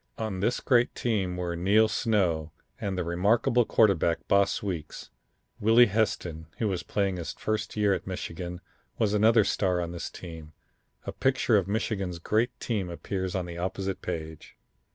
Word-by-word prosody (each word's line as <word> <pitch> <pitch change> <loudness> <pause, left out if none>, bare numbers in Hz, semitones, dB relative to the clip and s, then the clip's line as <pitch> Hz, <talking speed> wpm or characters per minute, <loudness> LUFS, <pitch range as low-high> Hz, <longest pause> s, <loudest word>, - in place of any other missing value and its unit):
On 110 -4 -3
this 115 +6 0
great 120 -1 +3
team 95 -7 -1
were 90 -1 -2
Neil 100 +6 +4
Snow, 90 -9 0 0.3
and 95 -2 -3
the 90 - 0
remarkable 110 +8 +2
quarterback 95 -8 +2
Boss 100 0 +2
Weeks. 85 -7 -5 0.5
Willie 115 +3 +6
Heston, 95 -7 -1
who 110 - 0
was 95 -4 -1
playing 100 -1 -1
his 80 -2 -5
first 110 0 -3
year 105 -2 +3
at - - -4
Michigan, 90 -1 -5 0.4
was 105 -2 +1
another 110 +1 +5
star 95 -2 +1
on 85 -1 -3
this 85 -1 -5
team. 80 -3 -10 0.5
A - - -3
picture 130 -3 +2
of 95 -3 +2
Michigan's 100 -4 -2
great 110 +8 0
team 100 -7 -2
appears 95 +2 -4
on 90 -2 -1
the 85 -1 -7
opposite 95 +1 -3
page. 80 -3 -6
95 Hz, 160 wpm, -28 LUFS, 85-110 Hz, 0.5 s, Willie